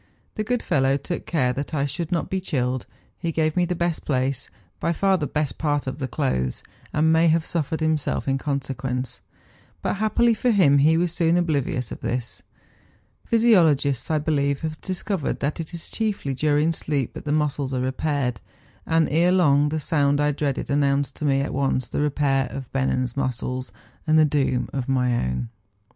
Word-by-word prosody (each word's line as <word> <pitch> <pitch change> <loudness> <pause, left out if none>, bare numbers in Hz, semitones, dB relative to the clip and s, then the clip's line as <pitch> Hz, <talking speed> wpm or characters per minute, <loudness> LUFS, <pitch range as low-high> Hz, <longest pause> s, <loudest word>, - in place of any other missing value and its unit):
The 215 - -2
good 245 +2 -1
fellow 135 0 +2
took 170 +5 -5
care 130 -7 +1
that 140 +4 -4
I 140 -1 +1
should 150 +4 -4
not 170 - 0
be 190 0 -2
chilled; 130 -7 -1 0.3
he 170 - -2
gave 155 -1 0
me 180 -1 +3
the 180 +1 -2
best 170 -1 -1
place, 130 -2 -1 0.3
by 170 - 0
far 195 +3 +2
the 155 -5 -1
best 150 -2 -2
part 145 -2 0
of 130 +2 -5
the 130 - -2
clothes, 90 - -1 0.3
and 160 +1 +3
may 165 +1 +4
have 160 0 +2
suffered 160 -1 -2
himself 155 -3 0
in 135 0 +1
con¬ 140 -1 -2
sequence; 130 -1 -4 0.6
but - - -1
happily 225 +3 +3
for 245 +3 0
him 165 -11 +5
he 155 +3 +4
was 170 -1 0
soon 170 0 +2
oblivious 140 -8 -1
of - - -6
this. 120 -1 -3 0.8
Physiologists, 165 - +3
I 155 - +2
believe, 140 -2 0
have 155 -1 -4
discovered 185 -3 -2
that 145 +3 -1
it 160 - -5
is 170 -2 -7
chiefly 205 -11 -1
during 150 +4 +2
sleep 145 -5 -1
that - - -9
the 145 - -1
muscles 145 -3 0
are 130 - -1
repaired; 130 -3 -1 0.5
and 165 -1 +3
ere 170 +4 +3
long 145 -5 +4
the 155 +1 -1
sound 145 -2 +1
I 145 0 +3
dreaded 140 -2 -2
an¬ 145 0 +2
nounced 140 -1 +1
to 150 - -3
me 135 -1 +3
at 140 - -3
once 135 -2 0
the - - -1
repair 140 -2 +1
of 135 -2 -7
Bennen's 130 -2 0
muscles 130 -1 -3 0.4
and 155 0 +4
the 155 - +6
doom 140 -4 +1
of 135 -1 -3
my 125 -2 +2
own. 65 - -2
145 Hz, 190 wpm, -24 LUFS, 135-165 Hz, 0.8 s, the